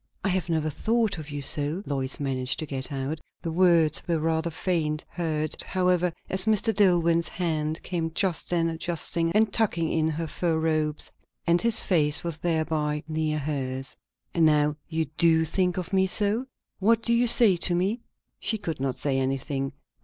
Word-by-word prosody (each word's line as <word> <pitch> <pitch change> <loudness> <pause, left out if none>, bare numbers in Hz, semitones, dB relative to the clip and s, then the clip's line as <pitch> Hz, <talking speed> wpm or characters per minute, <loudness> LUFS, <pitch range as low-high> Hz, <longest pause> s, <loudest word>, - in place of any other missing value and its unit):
"I 200 - +1
have 185 -1 -1
never 155 -2 0
thought 220 - 0
of 155 -1 -8
you 145 -1 -5
so," 150 +7 0
Lois 135 -2 -2
managed 130 -2 -1
to 155 - -4
get 135 -2 -4
out. 140 +3 -3 0.2
The 165 - -2
words 170 -3 +3
were 170 -2 +1
rather 160 +1 0
faint, 160 -2 -1
heard, 155 -3 -2
however, 180 -1 +1 0.2
as 190 +1 -1
Mr. 220 +1 +2
Dillwyn's 170 -4 +3
hand 155 -3 -2
came 165 -3 -2
just 185 -4 0
then 170 -1 +1
adjusting 165 0 -1
and 215 0 +3
tucking 175 -8 0
in 160 -1 +1
her 160 +1 -3
fur 165 +1 -1
robes, 155 -1 -1 0.3
and 170 0 +3
his 230 -1 +3
face 150 -5 +3
was 170 -2 -3
thereby 155 -2 -1
near 155 -1 -1
hers. 135 -3 -3 0.4
"And 170 - +2
now 150 -1 +3
you 160 -1 0
do 160 -1 +4
think 180 +2 0
of 185 +1 -4
me 190 0 +3
so? 210 +6 -1 0.3
What 225 +3 +3
do 235 - +3
you 240 +1 +3
say 230 -4 +6
to 175 +1 +1
me?" 195 +7 0 0.4
She 220 - 0
could 165 -8 -5
not 135 -1 -1
say 135 -2 -1
anything. 135 +1 -2
165 Hz, 175 wpm, -26 LUFS, 150-180 Hz, 0.4 s, say